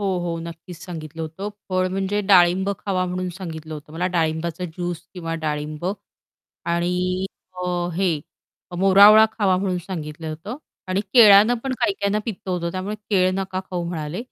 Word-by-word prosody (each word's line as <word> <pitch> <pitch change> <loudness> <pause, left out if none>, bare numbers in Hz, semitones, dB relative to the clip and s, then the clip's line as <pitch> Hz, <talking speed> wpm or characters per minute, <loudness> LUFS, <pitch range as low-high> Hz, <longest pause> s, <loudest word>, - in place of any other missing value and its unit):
हो, 200 - -1
हो. 170 -1 -3
नक्कीच 170 +1 -9
सांगितलं 165 -3 -7
होतं 165 +6 -5 0.2
फळ 185 0 +1
म्हणजे 195 +2 -1
डाळिंब 185 +1 +5
खावा 185 -2 -1
म्हणून 180 0 -3
सांगितलं 160 -4 -7
होतं 150 +1 -11
मला 175 +3 -1
डाळिंबाचा 165 +2 -1
ज्यूस 175 0 -4
किंवा 165 -2 -4
डाळिंब 150 +1 -3 0.9
आणि 180 +2 0 0.4
अ, 175 -1 -1
हे 175 -5 +1 0.6
मोरावळा 200 +3 +8
खावा 195 -4 +2
म्हणून 185 -1 -1
सांगितलं 160 -3 -6
होतं 170 - -6 0.3
आणि 185 +1 +1
केळ्यानं 215 -1 +8
पण 265 - -1
काही 205 - +3
काहींना 200 +1 +1
पित्तं 200 -4 -5
होतं 170 -1 -1
त्यामुळे 190 +3 -3 0.2
केळं 185 -2 +3
नका 190 -1 -2
खाऊ 175 -1 -2
म्हणाले. 165 +2 -4
180 Hz, 155 wpm, -22 LUFS, 165-195 Hz, 0.9 s, मोरावळा